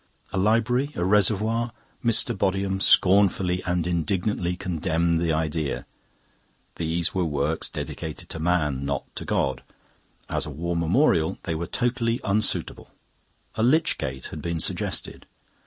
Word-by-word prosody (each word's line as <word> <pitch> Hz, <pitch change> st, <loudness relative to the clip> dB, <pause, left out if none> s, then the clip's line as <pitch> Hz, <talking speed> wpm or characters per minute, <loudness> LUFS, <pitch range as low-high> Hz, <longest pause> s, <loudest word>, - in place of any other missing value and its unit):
A -, -, -1 dB
library, 115 Hz, +7 st, +2 dB
a 85 Hz, -, -1 dB
reservoir? 110 Hz, +4 st, +2 dB, 0.3 s
Mr. 115 Hz, -2 st, +3 dB
Bodiham 95 Hz, 0 st, 0 dB
scornfully 95 Hz, -2 st, +4 dB
and 90 Hz, -1 st, 0 dB
indignantly 90 Hz, +1 st, -1 dB
condemned 85 Hz, -1 st, 0 dB
the 85 Hz, -1 st, +1 dB
idea. 80 Hz, -2 st, -1 dB, 0.9 s
These 85 Hz, +1 st, 0 dB
were 95 Hz, -, +1 dB
works 75 Hz, 0 st, -1 dB
dedicated -, -, -6 dB
to 80 Hz, -, -5 dB
man, 80 Hz, -5 st, 0 dB
not 70 Hz, -1 st, -2 dB
to -, -, -6 dB
God. 65 Hz, -1 st, 0 dB, 0.7 s
As -, -, -2 dB
a -, -, -5 dB
War 85 Hz, +4 st, -3 dB
Memorial 85 Hz, -, +2 dB
they 80 Hz, -, -2 dB
were 80 Hz, +1 st, -3 dB
totally 120 Hz, -1 st, 0 dB
unsuitable. 105 Hz, +1 st, +1 dB, 0.6 s
A -, -, -3 dB
lich 150 Hz, +8 st, +3 dB
gate 65 Hz, -4 st, -4 dB
had 75 Hz, -, -6 dB
been 85 Hz, 0 st, -2 dB
suggested. -, -, -3 dB
90 Hz, 135 wpm, -25 LUFS, 80-105 Hz, 0.9 s, scornfully